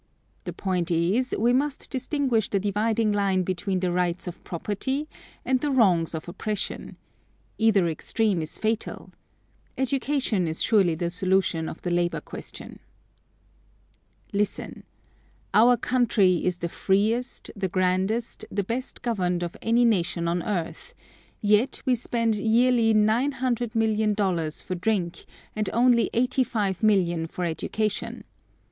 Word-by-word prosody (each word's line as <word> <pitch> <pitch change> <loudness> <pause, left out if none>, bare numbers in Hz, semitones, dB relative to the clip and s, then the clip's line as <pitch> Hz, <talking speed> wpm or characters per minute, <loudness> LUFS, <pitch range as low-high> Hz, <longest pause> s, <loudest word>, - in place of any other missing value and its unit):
The - - -4
point 180 -3 -2
is, 185 +10 +1
we 240 +3 +3
must 275 +2 -1
distinguish 260 -4 0
the 200 - +1
dividing 210 +2 +1
line 195 -2 +1
between 185 +1 -2
the 180 -1 0
rights 175 0 -1
of 180 -2 -8
property 265 - -3 0.4
and 260 -1 +2
the 295 - -1
wrongs 185 - +3
of 160 - -6
oppression. 210 +3 -4 0.6
Either 210 -5 +4
extreme 190 +3 0
is 155 0 -3
fatal. 220 0 -3 0.7
Education 265 - 0
is 160 0 -1
surely 195 -7 +3
the 170 +1 -2
solution 185 -3 +1
of - - -10
the 175 - -2
labor 175 0 +1
question. - - -10 1.5
Listen: 205 0 -2 0.7
Our 240 +3 +6
country 220 -7 +2
is 180 -1 +1
the 170 - -3
freest, 215 +8 0
the 195 -2 -2
grandest, 190 +6 0
the 200 0 -1
best 235 +6 -4
governed 180 -7 0
of 175 - -5
any 235 +2 +3
nation 175 -6 +1
on 175 +1 0
earth; 175 -3 -4 0.5
yet 210 +4 +2
we 260 - +3
spend 230 -1 0
yearly 230 +2 +3
nine 220 +7 +3
hundred 245 -3 -2
million 220 -1 +2
dollars 175 -7 -1
for 185 - -4
drink, 180 -2 -1 0.3
and 215 -1 -1
only 240 -1 +3
eighty 255 +2 +2
five 205 -7 -2
million 175 -6 +2
for 180 +2 -4
education. 210 +6 -2
210 Hz, 135 wpm, -25 LUFS, 180-235 Hz, 1.5 s, Our